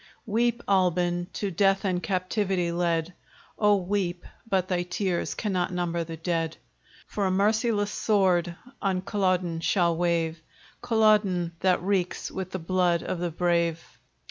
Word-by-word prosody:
Weep, 235 Hz, +2 st, 0 dB
Albin! 175 Hz, -2 st, +1 dB
to 200 Hz, -2 st, -3 dB
death 195 Hz, +3 st, +2 dB
and 180 Hz, -2 st, 0 dB
captivity 185 Hz, -2 st, -1 dB
led! 170 Hz, 0 st, 0 dB, 0.5 s
Oh 210 Hz, -1 st, +5 dB
weep! 185 Hz, -2 st, -2 dB, 0.2 s
but 190 Hz, -3 st, +1 dB
thy 180 Hz, -2 st, 0 dB
tears 180 Hz, 0 st, -2 dB
cannot 185 Hz, -4 st, -1 dB
number 175 Hz, -1 st, -1 dB
the 165 Hz, 0 st, -7 dB
dead: 165 Hz, -1 st, -2 dB, 0.5 s
For 200 Hz, -2 st, -1 dB
a -, -, +1 dB
merciless 210 Hz, +2 st, +1 dB
sword 185 Hz, -5 st, +2 dB, 0.3 s
on 190 Hz, -3 st, 0 dB
Culloden 185 Hz, -5 st, 0 dB
shall 170 Hz, 0 st, +2 dB
wave, 165 Hz, -1 st, 0 dB, 0.4 s
Culloden! 215 Hz, -7 st, +3 dB
that 185 Hz, -2 st, +2 dB
reeks 185 Hz, -2 st, -1 dB
with 190 Hz, -1 st, -5 dB
the 185 Hz, -, -4 dB
blood 175 Hz, -1 st, +1 dB
of 180 Hz, -, -3 dB
the 175 Hz, 0 st, -1 dB
brave. 170 Hz, -1 st, +1 dB
180 Hz, 140 wpm, -26 LUFS, 175-200 Hz, 0.5 s, Oh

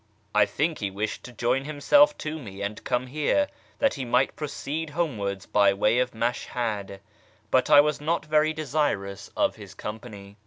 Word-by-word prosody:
I 105 Hz, -, +5 dB
think 155 Hz, +2 st, -1 dB
he 100 Hz, -, -1 dB
wished 105 Hz, +3 st, -4 dB
to 125 Hz, -, -9 dB
join 125 Hz, +3 st, 0 dB
himself 290 Hz, -, +4 dB
to 155 Hz, +1 st, -3 dB
me 100 Hz, -6 st, -8 dB
and 105 Hz, +1 st, -4 dB
come 125 Hz, +1 st, 0 dB
here, 155 Hz, -, +1 dB, 0.3 s
that 275 Hz, -, +2 dB
he 135 Hz, -, -4 dB
might 125 Hz, +2 st, +2 dB
proceed 150 Hz, +1 st, -4 dB
homewards 110 Hz, -, -2 dB
by 100 Hz, -1 st, +4 dB
way 105 Hz, +4 st, +3 dB
of 125 Hz, -2 st, -1 dB
Mashhad; 110 Hz, -4 st, -2 dB, 0.5 s
but 130 Hz, +2 st, +3 dB
I 145 Hz, -1 st, +9 dB
was 150 Hz, 0 st, -1 dB
not 165 Hz, +2 st, 0 dB
very 155 Hz, 0 st, +3 dB
desirous 145 Hz, -11 st, -2 dB
of -, -, +1 dB
his 100 Hz, -3 st, -11 dB
company." 105 Hz, -2 st, -8 dB
125 Hz, 170 wpm, -26 LUFS, 105-150 Hz, 0.5 s, I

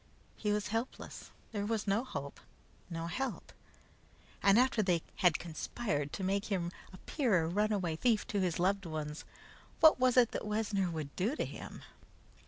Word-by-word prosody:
He 210 Hz, -, -1 dB
was 210 Hz, 0 st, 0 dB
helpless. 225 Hz, +4 st, -4 dB, 0.2 s
There 205 Hz, -3 st, -2 dB
was 220 Hz, -1 st, -1 dB
no 205 Hz, +4 st, +2 dB
hope, 140 Hz, -, -6 dB, 0.5 s
no 165 Hz, -1 st, -4 dB
help. 255 Hz, +10 st, -3 dB, 0.9 s
And 200 Hz, +1 st, +6 dB
after 250 Hz, -2 st, +4 dB
they 180 Hz, -5 st, +1 dB
had 180 Hz, -5 st, +4 dB
conspired 155 Hz, -2 st, -3 dB
to 195 Hz, -, -4 dB
make 200 Hz, +2 st, 0 dB
him 180 Hz, -5 st, -1 dB, 0.2 s
appear 195 Hz, -, +1 dB
a -, -, -1 dB
runaway 190 Hz, -3 st, 0 dB
thief 225 Hz, +1 st, +2 dB
to 205 Hz, -, 0 dB
his 180 Hz, -3 st, 0 dB
loved 195 Hz, +1 st, +1 dB
ones, 155 Hz, -1 st, -5 dB, 0.5 s
what 315 Hz, -4 st, +7 dB
was 255 Hz, 0 st, +3 dB
it 240 Hz, -2 st, +6 dB
that -, -, -3 dB
Wessner 210 Hz, -3 st, 0 dB
would 155 Hz, -4 st, -5 dB
do 215 Hz, +10 st, 0 dB
to -, -, -1 dB
him? -, -, -8 dB
200 Hz, 165 wpm, -33 LUFS, 170-225 Hz, 0.9 s, what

